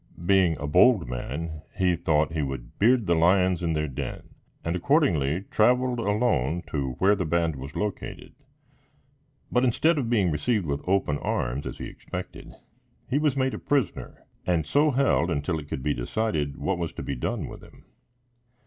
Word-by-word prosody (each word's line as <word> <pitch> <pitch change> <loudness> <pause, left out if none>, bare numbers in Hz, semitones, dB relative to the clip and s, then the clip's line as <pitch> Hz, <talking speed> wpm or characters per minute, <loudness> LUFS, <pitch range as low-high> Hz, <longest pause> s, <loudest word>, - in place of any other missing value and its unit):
Being 90 -4 +4
a 70 - -4
bold 95 - +4
man, 75 +6 -5 0.2
he 90 -3 +3
thought 80 -1 +1
he 80 - -1
would 65 -4 -6
beard 120 +1 +4
the 85 - +2
lions 90 +2 +3
in 85 -2 0
their 75 0 -1
den, 65 - -6 0.4
and 85 +2 -1
accordingly, 90 - +2
traveled 125 +2 +3
alone 100 - +1
to 70 -4 -2
where 95 +10 +3
the 95 - -2
band 85 -1 0
was 70 +3 -8
located; 105 -2 -4 1.2
but, 125 - +2
instead 150 +6 +3
of 120 -4 -2
being 100 -7 +2
received 90 +7 0
with 70 -1 -2
open 90 -7 +1
arms, 65 +4 -2
as - - -6
he - - -6
expected, - - -8 0.5
he 135 +3 +1
was 150 -3 +1
made 130 0 +1
a - - -4
prisoner, 140 -3 -2 0.2
and 85 -3 +1
so 145 - +3
held 130 - +2
until 80 +1 -1
it 75 - -10
could 65 - -4
be 75 0 +1
decided 75 - -2
what 95 -2 -1
was 85 -1 -3
to - - -6
be - - -3
done - - -3
with - - -10
him. - - -17
85 Hz, 175 wpm, -26 LUFS, 75-110 Hz, 1.2 s, Being